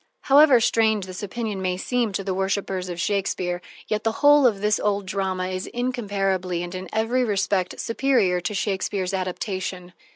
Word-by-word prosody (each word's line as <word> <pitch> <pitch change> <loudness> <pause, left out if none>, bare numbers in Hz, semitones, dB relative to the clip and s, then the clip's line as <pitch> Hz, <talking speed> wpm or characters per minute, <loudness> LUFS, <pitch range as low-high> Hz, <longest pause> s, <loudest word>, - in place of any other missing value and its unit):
However 275 -2 +6
strange 220 -3 +2
this 185 -1 -8
opinion 210 -1 -4
may 180 -1 -1
seem 240 +2 -1
to 195 - -2
worshipers 190 -1 -2
of 175 -1 -5
Shakespeare, 185 -2 -1 0.3
yet 215 0 -1
the 225 - +1
whole 290 -2 +7
of 210 -5 0
this 210 0 +2
old 205 -1 0
drama 185 -1 -2
is 185 0 -4
incomparably 195 -8 -1
and 175 0 -6
in 185 -1 -6
every 230 +4 +1
respect 195 -4 0
superior 230 -7 +1
to 210 - -3
Shakespeare's 195 -1 -1
adaptation. 185 -1 -4
195 Hz, 160 wpm, -24 LUFS, 185-225 Hz, 0.3 s, whole